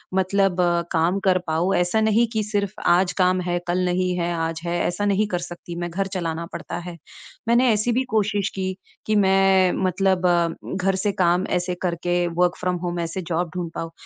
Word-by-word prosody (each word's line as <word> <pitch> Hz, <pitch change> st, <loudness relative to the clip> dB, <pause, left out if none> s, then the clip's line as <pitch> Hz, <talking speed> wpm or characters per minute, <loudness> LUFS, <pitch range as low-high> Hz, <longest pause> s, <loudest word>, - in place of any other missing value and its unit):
मतलब 190 Hz, 0 st, +2 dB, 0.4 s
काम 170 Hz, +4 st, +2 dB
कर 185 Hz, -1 st, +4 dB
पाऊँ 165 Hz, +4 st, +1 dB
ऐसा 180 Hz, +5 st, +1 dB
नहीं 220 Hz, +2 st, +3 dB
कि 220 Hz, -1 st, 0 dB
सिर्फ 205 Hz, -1 st, -2 dB
आज 175 Hz, +1 st, +4 dB
काम 185 Hz, 0 st, +3 dB
है, 175 Hz, 0 st, -1 dB
कल 180 Hz, +1 st, +1 dB
नहीं 180 Hz, 0 st, 0 dB
है, 175 Hz, 0 st, -1 dB
आज 165 Hz, 0 st, -2 dB
है, 175 Hz, 0 st, -1 dB
ऐसा 190 Hz, +4 st, -2 dB
नहीं 205 Hz, +1 st, +2 dB
कर -, -, -1 dB
सकती 175 Hz, 0 st, -8 dB
मैं 175 Hz, -, -3 dB
घर 195 Hz, +3 st, -2 dB
चलाना 170 Hz, -2 st, -3 dB
पड़ता -, -, -5 dB
है। 170 Hz, -, -9 dB, 0.5 s
मैंने 240 Hz, +2 st, +4 dB
ऐसी 215 Hz, +3 st, 0 dB
भी 250 Hz, +3 st, +1 dB
कोशिश 205 Hz, -1 st, +1 dB
की 190 Hz, -1 st, -2 dB, 0.3 s
कि 215 Hz, -, +1 dB
मैं 190 Hz, -2 st, +4 dB
मतलब 185 Hz, 0 st, +2 dB, 0.5 s
घर 195 Hz, 0 st, +1 dB
से 200 Hz, +2 st, 0 dB
काम 175 Hz, +2 st, +2 dB
ऐसे 180 Hz, 0 st, -3 dB
करके 175 Hz, 0 st, 0 dB
वर्क 180 Hz, 0 st, +2 dB
फ्रॉम 180 Hz, 0 st, -1 dB
होम 175 Hz, 0 st, -2 dB
ऐसे 170 Hz, +3 st, -3 dB
जॉब 170 Hz, +1 st, -1 dB
ढूँढ 175 Hz, -2 st, -3 dB
पाऊँ, 165 Hz, 0 st, -4 dB
185 Hz, 190 wpm, -23 LUFS, 175-195 Hz, 0.5 s, कर